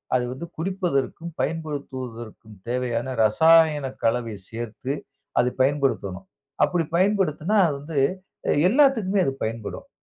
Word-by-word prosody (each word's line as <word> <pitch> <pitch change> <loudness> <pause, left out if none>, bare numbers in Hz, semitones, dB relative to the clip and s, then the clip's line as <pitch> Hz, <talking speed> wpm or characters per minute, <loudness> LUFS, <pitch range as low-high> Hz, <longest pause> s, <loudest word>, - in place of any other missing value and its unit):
அது 125 - +2
வந்து 130 +6 -6
குடிப்பதற்கும், 170 -2 -2
பயன்படுத்துவதற்கும் 130 -8 -5
தேவையான 120 -1 -1 0.2
ரசாயன 160 +5 +5 0.2
கலவை 115 -1 0
சேர்த்து 120 +3 -4 0.5
அதை 125 +1 +3
பயன்படுத்தணும். 130 -9 0 0.4
அப்படி 175 -2 +2
பயன்படுத்தினா, 190 -1 +2
அது 150 - -1
வந்து 145 0 -3 0.5
அ - - +4 0.2
எல்லாத்துக்குமே 225 -7 +3
அது 135 - +1
பயன்படும். 110 -1 -5
140 Hz, 110 wpm, -24 LUFS, 120-170 Hz, 0.5 s, ரசாயன